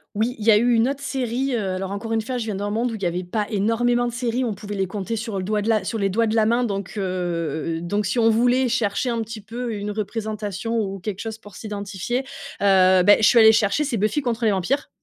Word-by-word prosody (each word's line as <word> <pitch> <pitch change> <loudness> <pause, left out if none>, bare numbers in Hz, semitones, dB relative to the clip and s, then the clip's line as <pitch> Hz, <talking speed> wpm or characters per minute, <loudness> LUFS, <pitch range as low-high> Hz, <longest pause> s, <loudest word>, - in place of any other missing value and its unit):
Oui, 225 +4 0
il 210 - -5
y 225 - +7
a - - +7
eu 240 +3 +3
une 230 +2 +3
autre 280 0 -3
série, 260 0 -2
heu - - 0 0.2
alors 190 +1 -4
encore 225 +3 -4
une 225 - +1
fois, 250 +3 -4
je 235 - -3
viens 215 -3 -3
d'un 205 +1 -3
monde 230 +4 0
où 230 - -4
il 205 - -8
y - - +1
avait 175 +1 -2
pas 210 +4 -1
énormément 235 +3 +1
de 240 - -4
séries. 240 +1 -1
On 225 - -1
pouvait 205 +1 -7
les 195 -1 -1
compter 205 +4 -4
sur 220 -2 -4
le 190 - -2
doigt 210 +2 0
de 205 - -4
la 220 -2 +2
sur 225 - -3
les 200 - +2
doigts 230 +4 +1
de 220 0 -1
la 220 - +4
main. 235 +3 +2
Donc 200 -5 -3
heu 170 -4 -2
donc 205 +5 -1
si 205 +6 -1
on 225 -1 +4
voulait 245 +3 +3
chercher 220 +3 0
un 230 -1 -1
petit 225 0 -7
peu 230 +3 -5
une 205 0 -4
représentation 215 +1 -3
ou 195 -2 -3
quelque 195 +1 -5
chose 225 -1 -5
pour 205 -3 -15
s'identifier, 205 +2 -3 0.4
heu, 185 -2 +5
beh, 205 +2 +7
je 215 - +5
suis 240 - +6
allée 220 -1 +8
chercher, 215 +5 +2
c'est 270 -5 -1
Buffy 215 +8 0
contre 240 -3 -1
les 215 - +4
vampires, 215 +10 -1
215 Hz, 270 wpm, -22 LUFS, 200-235 Hz, 0.4 s, allée